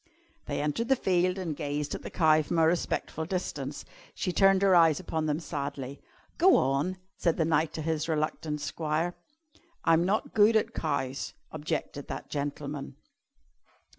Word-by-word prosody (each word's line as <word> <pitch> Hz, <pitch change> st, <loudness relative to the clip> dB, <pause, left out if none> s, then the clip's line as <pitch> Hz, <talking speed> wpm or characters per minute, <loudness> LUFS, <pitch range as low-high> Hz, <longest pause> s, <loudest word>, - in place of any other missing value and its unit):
They -, -, -2 dB
entered 150 Hz, +11 st, -1 dB
the 270 Hz, -, +4 dB
field 180 Hz, -4 st, +1 dB
and 170 Hz, -5 st, -3 dB
gazed 145 Hz, -1 st, -3 dB
at -, -, -5 dB
the -, -, -7 dB
cow 155 Hz, -2 st, +4 dB
from 160 Hz, +3 st, -2 dB
a 165 Hz, -, +5 dB
respectful 160 Hz, -1 st, 0 dB
distance. 155 Hz, -5 st, -4 dB, 0.3 s
She 180 Hz, -, -1 dB
turned 195 Hz, +1 st, +5 dB
her 195 Hz, -1 st, +5 dB
eyes 165 Hz, -4 st, +5 dB
upon 160 Hz, -1 st, -2 dB
them 150 Hz, +1 st, 0 dB
sadly. 140 Hz, -4 st, -5 dB, 0.4 s
"Go 370 Hz, +3 st, +7 dB
on!" 140 Hz, +8 st, +1 dB, 0.2 s
said 170 Hz, -2 st, +1 dB
the 160 Hz, -, +2 dB
knight 160 Hz, 0 st, +2 dB
to 155 Hz, -, -4 dB
his 160 Hz, 0 st, -1 dB
reluctant 155 Hz, -1 st, -1 dB
squire. 155 Hz, +3 st, -1 dB, 0.7 s
"I'm 165 Hz, 0 st, +5 dB
not 195 Hz, +4 st, 0 dB
good 215 Hz, +1 st, +5 dB
at 220 Hz, -, +2 dB
cows," 140 Hz, -4 st, -2 dB, 0.2 s
objected 155 Hz, -2 st, -4 dB
that -, -, -6 dB
gentleman. 145 Hz, -1 st, -4 dB
160 Hz, 160 wpm, -29 LUFS, 150-175 Hz, 0.7 s, Go